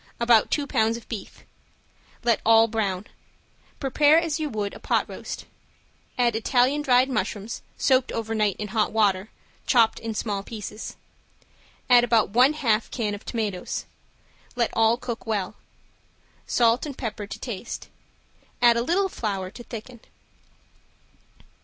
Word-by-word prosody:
About 235 -2 +4
two 290 - 0
pounds 225 -4 +1
of 235 - -13
beef. 215 -5 -8 0.8
Let 235 -2 +2
all 225 0 +6
brown. 210 -4 -2 0.7
Prepare 295 +3 +4
as 330 -2 0
you 305 -1 -2
would 210 -4 -3
a - - -10
pot - - 0
roast. - - -7 0.7
Add 240 -2 +2
Italian 250 +5 +2
dried 255 -2 +4
mushrooms, 215 -3 -3 0.2
soaked 260 -1 +2
over 225 -1 -3
night 210 -3 +1
in 210 -1 -5
hot 215 0 +1
water, 205 -2 +1 0.4
chopped 230 -3 +4
in 225 -1 -5
small 205 -2 -2
pieces. 210 0 -7 0.9
Add 245 -1 +7
about 230 -4 +2
one 250 +7 +5
half 230 -8 +1
can 215 -4 -2
of 205 - -7
tomatoes. 210 -6 -3 0.7
Let 235 -2 +1
all 225 +1 +3
cook 240 -2 -6
well. 205 -4 -1 0.9
Salt 235 +4 +2
and 280 - -7
pepper 215 -4 -5
to - - -7
taste. 235 -2 -6 0.7
Add 240 -1 +5
a - - +2
little 355 +10 +1
flour 195 - -4
to 240 - -11
thicken. 235 +1 -9
230 Hz, 140 wpm, -25 LUFS, 215-250 Hz, 0.9 s, Add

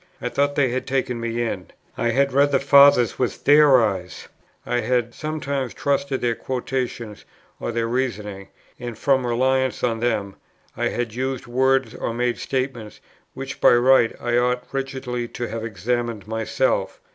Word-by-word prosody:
I 125 - -3
thought 140 +2 0
they 140 -3 +2
had 130 +1 -3
taken 130 -3 -1
me 115 0 -2
in; 95 -5 -4 0.3
I 120 - 0
had 135 +3 +1
read 140 +1 +4
the 135 - +3
Fathers 140 -3 +5
with 125 -2 -2
their 145 -2 +6
eyes; 95 -4 -5 0.4
I 120 - 0
had 120 0 0
sometimes 140 -5 -3
trusted 140 -1 -1
their 120 -1 +1
quotations 125 -3 -4 0.4
or - - -3
their 115 0 -1
reasonings; 105 -6 -3 0.3
and 120 -3 -6
from 130 -1 +1
reliance 130 +2 +1
on 115 -2 0
them, 110 -5 -1 0.4
I - - 0
had 120 -2 -3
used 130 +1 -3
words 130 0 +1
or 115 - -4
made 120 0 -1
statements, 130 -5 -4 0.4
which 135 0 -7
by - - +7
right 120 -1 +4
I 120 0 0
ought 125 0 0
rigidly 130 -3 -3
to 120 0 -5
have 115 -1 -5
examined 115 0 -3
myself. 110 0 -1
125 Hz, 160 wpm, -22 LUFS, 115-135 Hz, 0.4 s, by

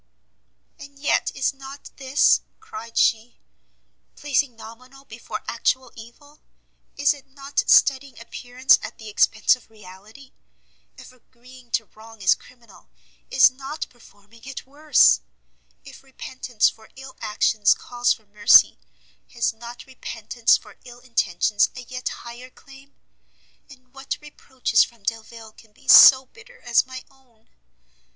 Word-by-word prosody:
"And 280 0 -13
yet 285 +1 0
is 270 +1 -1
not 270 +1 -12
this," 270 +1 +2 0.2
cried 435 - -10
she, 230 +2 +1 0.8
"placing 285 -3 -1
nominal 255 +5 -14
before 230 -2 -8
actual 255 +2 -1
evil? 285 +6 -15 0.6
Is 285 +1 +3
it 285 -2 -16
not 275 +1 -3
studying 275 -1 +3
appearance 245 +2 +1
at - - -9
the 220 -1 -10
expence 215 +2 +2
of 250 - -21
reality? 215 +5 -16 0.6
If - - -14
agreeing 255 0 -19
to 225 - 0
wrong 220 +1 -17
is 185 - +5
criminal, 240 -2 -18 0.4
is 260 0 +5
not 275 +4 -7
performing 225 -1 -21
it 270 -1 -8
worse? 285 - +3 0.6
If - - -14
repentance 255 -3 -2
for 220 -1 -7
ill 265 0 -12
actions 210 -1 +2
calls 245 0 -1
for 220 - -3
mercy, 205 - +5 0.5
has 235 -1 -1
not 235 +2 -11
repentance 235 -3 -1
for - - -18
ill 245 -1 -14
intentions 210 -4 0
a 255 - -8
yet 250 +1 -6
higher 240 +2 -11
claim? 275 +1 -18 0.7
And 255 -2 -19
what 270 0 -6
reproaches 265 -5 0
from 235 -3 -12
Delvile 225 +1 -6
can 215 0 -21
be - - -24
so 265 -1 +9
bitter 455 - -19
as 240 +1 +2
my 260 0 -9
own? 245 -5 -30
250 Hz, 135 wpm, -22 LUFS, 225-270 Hz, 0.8 s, so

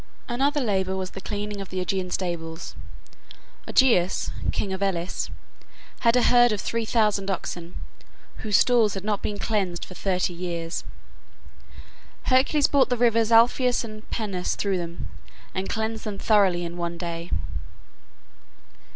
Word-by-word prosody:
Another 275 +5 +1
labor 190 -5 0
was 185 -1 -4
the 195 - -8
cleaning 205 0 -4
of 195 - -7
the 185 - -3
Augean 185 0 -1
stables. 170 -3 -4 0.9
Augeas, 190 -9 +3 0.2
king 195 - -2
of 190 - -5
Elis, 185 -2 -1 0.7
had 230 0 +4
a 250 - +4
herd 240 -1 +6
of 210 - -1
three 230 +3 -2
thousand 210 -3 +1
oxen, 175 -2 -4 0.6
whose 210 -2 +2
stalls 235 -5 +4
had 195 - -5
not 210 -1 -1
been 205 - -3
cleansed 195 -5 -1
for - - -11
thirty 185 -1 0
years. 170 -1 -4 1.4
Hercules 275 +3 +3
brought 280 -2 +4
the 245 - +1
rivers 230 -1 +3
Alpheus 245 +2 +4
and 215 -1 -9
Peneus 195 -5 -2
through 195 -3 0
them, 170 0 -5 0.5
and 190 +1 -3
cleansed 220 0 -2
them 210 -2 -4
thoroughly 195 -6 +3
in 170 +1 -6
one 170 0 -3
day. 170 -1 -5
200 Hz, 140 wpm, -25 LUFS, 180-225 Hz, 1.4 s, herd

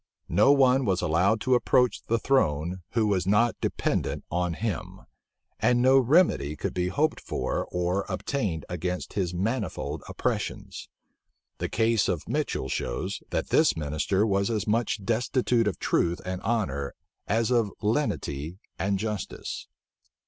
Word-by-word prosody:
No 105 +11 +5
one 135 -1 +4
was 95 -6 +1
allowed 95 +8 +2
to 130 - +2
approach 125 0 +3
the 115 - +2
throne 90 - +1
who 115 -1 +2
was 95 -3 +1
not 110 +4 +3
dependent - - -1
on 90 0 0
him; 105 -4 -4 0.6
and 125 -1 +3
no 130 +2 +6
remedy 130 - +3
could - - -3
be 90 0 0
hoped 150 +12 0
for - - -2
or 90 +2 -1
obtained 100 - -2
against 90 +1 -4
his 95 -4 -1
manifold 105 +1 -2
oppressions. - - -3 0.7
The - - -2
case 115 -1 +2
of 85 -5 -2
Mitchel - - -1
shows, 95 +11 -3
that - - -2
this - - +4
minister 75 +6 0
was 100 -1 +1
as 110 -4 -1
much 110 -2 0
destitute 120 0 +1
of 100 - -1
truth 85 +1 +1
and 90 0 -4
honor 70 - -1 0.3
as 115 +4 +1
of 115 -5 +2
lenity 90 - -1 0.2
and 100 +1 +1
justice. 105 -1 -4
100 Hz, 140 wpm, -27 LUFS, 90-115 Hz, 0.7 s, no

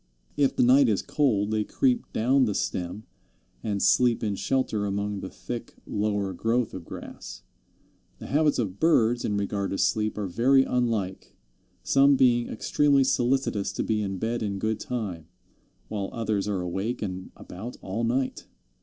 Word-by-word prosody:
If 140 -2 +2
the - - +3
night 130 +1 +6
is 105 - +1
cold 110 -8 +1
they 110 -1 +1
creep 250 - 0
down 130 +4 +3
the 105 -4 -1
stem 90 +4 -3 0.6
and 100 -3 -2
sleep 120 -2 +3
in 105 -2 0
shelter 110 -1 -1
among 100 0 -2
the 95 - -6
thick 120 -1 -7
lower 100 -2 -1
growth 115 +5 0
of 90 -3 -7
grass. - - -9 0.7
The - - -10
habits 150 +1 +2
of 100 -5 -2
birds 120 -7 +3
in 105 - 0
regard 100 -1 -2
to 95 - -2
sleep 105 +2 +1
are 105 - -2
very 125 +9 +4
unlike, 115 -8 -2 0.5
some 140 +1 +5
being 120 -2 +3
extremely 140 +4 +2
solicitous 125 -6 +1
to - - -2
be 110 -1 0
in 95 -2 -3
bed 115 +4 -2
in 100 -2 -2
good 110 +2 -1
time, 95 -10 -4 0.6
while 100 -2 -3
others 110 -3 -1
are 100 -3 -1
awake 95 +7 -3
and 95 -2 -5
about 110 +8 -9
all 100 +5 -3
night. 130 +3 -1
110 Hz, 165 wpm, -26 LUFS, 100-125 Hz, 0.7 s, night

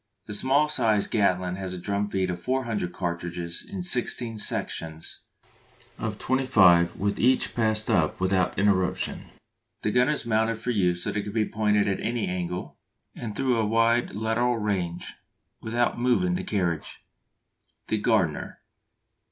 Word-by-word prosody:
The 105 - -6
small 135 +7 +3
sized 110 -8 +1
Gatling 90 -4 +1
has 95 -1 -5
a - - -6
drum 100 +3 -2
feed 95 -2 -1
of 90 0 -6
400 120 -7 -1
cartridges 85 -1 -3
in 195 -2 -6
sixteen 120 -7 +1
sections 80 -5 -2 0.8
of - - -3
twenty 130 +1 0
five 90 -7 +5 0.2
each 130 +3 +3
passed 110 -2 +2
up 80 -4 +1
without 95 0 +1
interruption. 95 -2 +1 0.6
The 105 - +1
gun 125 +4 +3
is 150 -4 -1
mounted 110 0 +1
for 120 +2 -3
use 90 -5 +1
so - - -2
that 105 - -2
it - - -3
can 105 - -6
be 110 -2 +1
pointed 105 -1 +1
at 95 - 0
any 120 -1 -1
angle, 90 0 -4 0.3
and 110 -4 -6
through 130 -3 +1
a 110 - +1
wide 115 0 +2
lateral 115 +3 0
range, 95 -5 -2 0.5
without 120 +2 0
moving 125 +9 +2
the 180 - -2
carriage. 90 -6 -2 0.8
_The 110 -1 -1
Gardner. 100 -11 0
105 Hz, 150 wpm, -26 LUFS, 90-120 Hz, 0.8 s, five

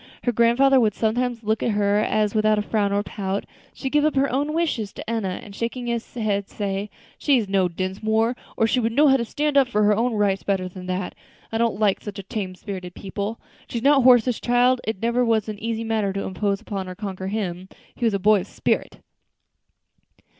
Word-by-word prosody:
Her 245 - +2
grandfather 240 +4 +4
would 215 -4 +2
sometimes 235 +1 -1
look 220 +1 0
at - - +1
her 205 0 +2
as, 210 -1 +1
without 215 -1 +3
a 210 - 0
frown 205 -1 0
or 200 0 +1
a - - -7
pout, 200 -1 -3 0.3
she - - -12
would 265 - 0
give 295 0 +3
up 310 -1 +2
her 275 +1 +2
own 285 +4 0
wishes 305 -11 -1
to - - -9
Enna, 215 -5 -2
and 200 -2 -11
shaking 235 +2 -3
his 235 -1 -3
head, 205 -4 -1
say, 200 0 -3 0.3
"She's 255 -8 +2
no 195 -1 +2
Dinsmore, 215 +6 -1 0.2
or 225 - +3
she 250 +3 +2
would 225 -1 0
know 290 +3 +5
how 270 - +5
to 235 - -1
stand 295 +5 -1
up 270 -2 +5
for 210 -3 +1
her 210 0 +4
own 235 +3 +1
rights 200 -2 +1
better 190 -2 -1
than 180 0 -9
that. 185 0 -3 0.4
I 225 - -1
don't 230 -3 +1
like 205 -3 +2
such 205 -1 -7
tame 190 -4 -4
spirited 185 -2 -7
people. 200 +3 -5 0.3
She's 235 -1 -3
not 280 0 +5
Horace's 245 -1 +5
child; 245 +1 +3
it 220 -1 -3
never 235 +2 +2
was 225 -3 +1
an 210 -2 -5
easy 230 0 -2
matter 220 -3 0
to 195 - -3
impose 200 +1 -1
upon 195 -2 -5
or 185 - -7
conquer 190 -2 -5
him. 190 -3 -3 0.2
He - - -8
was 225 -3 +3
a - - -1
boy 210 +2 +4
of - - -7
spirit." - - -2
215 Hz, 220 wpm, -23 LUFS, 200-240 Hz, 0.4 s, know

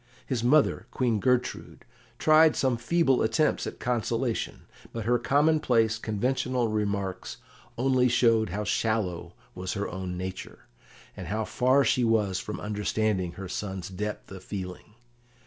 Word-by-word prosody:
His 125 -4 -2
mother, 145 +4 +3
Queen 120 -4 0
Gertrude, 125 +2 -1 0.3
tried 155 0 +5
some 130 -2 +1
feeble 135 +3 +2
attempts 115 +8 +1
at - - -7
consolation, 120 0 -2 0.3
but 115 -2 -5
her 120 +1 +2
commonplace, 130 -6 +2
conventional 125 +2 -1
remarks 100 -3 -2 0.4
only 130 0 +3
showed 115 -3 +3
how 105 +5 -3
shallow 95 -7 -1 0.2
was 90 0 -4
her 100 -1 -2
own 90 -1 -5
nature, 95 +1 -7 0.5
and - - -7
how 110 +1 -2
far 130 +5 +3
she 125 - +2
was 105 -5 +1
from 105 - -6
understanding 105 -3 -1
her 95 +1 -7
son's 95 -1 -5
depth 105 +2 -5
of 95 -1 -9
feeling. 95 +1 -7
110 Hz, 135 wpm, -27 LUFS, 100-125 Hz, 0.5 s, tried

